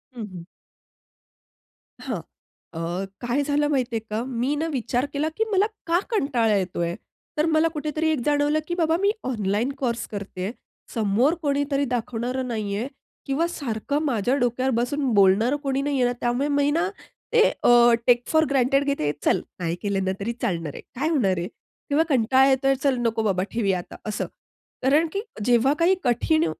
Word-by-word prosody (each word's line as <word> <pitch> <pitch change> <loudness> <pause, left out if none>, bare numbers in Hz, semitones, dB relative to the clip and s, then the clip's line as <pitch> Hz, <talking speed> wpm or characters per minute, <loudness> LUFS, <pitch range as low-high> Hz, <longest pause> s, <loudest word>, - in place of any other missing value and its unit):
हं, 235 - -5
हं. 175 -2 -8 1.6
हां. - - -4 0.5
अ, 170 +3 -3 0.2
काय 245 +3 0
झालं 290 +1 +1
माहिती 255 -5 0
आहे 225 - +1
का? 215 +2 -2
मी 260 +3 -1
ना, 320 +2 -1
विचार 245 +1 0
केला 300 +2 0
की 445 - +3
मला 395 0 +4 0.2
का 340 +2 +3
कंटाळा 245 - +2
येतो 185 -2 -3
आहे? 170 0 -1 0.4
तर 300 - +3
मला 320 0 +3
कुठेतरी 310 +1 -1
एक 305 - 0
जाणवलं 295 +1 +2
की 345 - -2
बाबा 325 -2 +2
मी 400 +1 +4
ऑनलाईन 215 0 -1
कोर्स 240 -3 -2
करते 195 -3 -5
आहे. 200 - -2 0.4
समोर 225 +7 +2
कोणीतरी 285 -1 0
दाखवणारं 250 +1 -2
नाही 215 -4 -2
आहे 235 +5 -2 0.4
किंवा 295 +5 +1
सारखं 280 -2 -2
माझ्या 245 -1 +1
डोक्यावर 255 0 +1
बसून 255 +3 0
बोलणारं 205 +6 +4
कोणी 275 0 0
नाही 280 -2 0
आहे. 245 0 +2
त्यामुळे 245 +4 +1
मी 285 0 +2
ना, 335 +5 +1 0.4
ते 470 - +6 0.2
अ, 240 0 +6
टेक 245 -1 +5
फोर 315 0 +3
ग्रांटेड 275 +1 +3
घेते. 280 - 0
चल - - +3 0.2
नाही 170 -1 -1
केलं 200 -2 -1
ना, 190 - +1
तरी 220 +4 -2
चालणार 165 -5 -2
आहे, - - -8
काय 290 +6 0
होणार 200 - +2
आहे? 175 - -2 0.4
तेव्हा 290 +3 +3
कंटाळा 260 +1 +4
येतो 270 +1 +2
आहे, 270 - +4
"चल 275 -3 +2
नको 230 -2 0
बाबा, 190 -3 +1
ठेवुया 200 -5 +1
आता," 175 - -10
असं. 215 - -2 0.6
कारण 295 +5 +4
की 400 - -1 0.2
जेव्हा 245 +3 +4
काही 350 +3 +4
कठीण 300 +6 +2
255 Hz, 180 wpm, -24 LUFS, 220-290 Hz, 1.6 s, ते